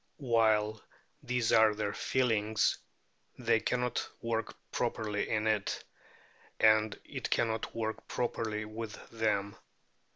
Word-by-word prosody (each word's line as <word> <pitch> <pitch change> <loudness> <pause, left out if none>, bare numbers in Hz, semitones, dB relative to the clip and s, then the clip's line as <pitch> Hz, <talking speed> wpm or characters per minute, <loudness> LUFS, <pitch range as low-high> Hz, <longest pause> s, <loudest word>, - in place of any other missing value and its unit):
While 110 -4 +2 0.4
these 125 -2 0
are 110 -1 +6
their 105 -1 -2
feelings 110 -5 +1 0.6
they - - +3
cannot 125 -1 -1
work 115 -1 -2 0.2
properly 105 -2 -1
in 110 -1 +1
it, 110 -2 0 0.8
and 110 -1 +4
it - - -5
cannot 115 -1 0
work 110 -1 -3
properly 110 -3 -2
with 110 0 -6 0.2
them. 105 -3 0
110 Hz, 105 wpm, -32 LUFS, 105-115 Hz, 0.8 s, are